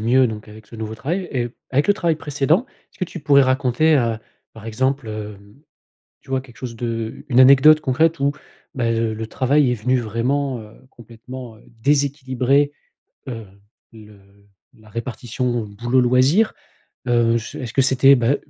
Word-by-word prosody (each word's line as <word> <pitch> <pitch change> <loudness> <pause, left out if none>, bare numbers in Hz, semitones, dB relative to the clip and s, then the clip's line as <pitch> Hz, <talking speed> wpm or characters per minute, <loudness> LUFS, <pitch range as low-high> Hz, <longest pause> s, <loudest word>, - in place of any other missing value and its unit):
mieux 125 +3 +3
donc 105 -1 -7
avec 105 0 -13
ce 115 - -11
nouveau 110 0 -5
travail. 175 +10 -3
Et 120 -2 -1 0.2
avec 140 +6 +1
le 205 - +5
travail 170 -5 0
précédent, 155 - 0 0.3
est-ce - - -25
que 185 - +1
tu 175 0 -9
pourrais 140 -2 +4
raconter, 130 +4 +2
heu, 115 -3 0 0.4
par 110 - -13
exemple, 130 +1 -1
hem, 105 0 -8 0.7
tu - - -17
vois 130 -1 0
quelque 125 -4 -16
chose 120 -1 -7
de 115 +2 -4
une 125 - +1
anecdote 140 +4 +7
concrète 160 +5 +1
où 140 +1 +2 0.4
ben, 115 -3 0
heu, 115 -1 0
le 110 +1 -5
travail 130 +3 +2
est - - +1
venu 125 +3 0
vraiment, 125 +3 -1
heu, 105 0 -12 0.2
complètement, 120 +1 -11
heu, - - -22 0.2
déséquilibrer, 140 0 +1 0.6
heu, 115 -4 -6 0.5
le 105 -2 -15 0.6
la 110 -1 -20
répartition 120 +1 -3 0.2
boulot, 120 +2 +2
loisir? 130 - +3 0.5
Heu, 120 -1 +2
j 115 +6 -5
est-ce 125 -5 -6
que 135 - +4
c'était, 135 +1 +5
bah, 120 +4 +2
125 Hz, 170 wpm, -20 LUFS, 115-140 Hz, 0.7 s, anecdote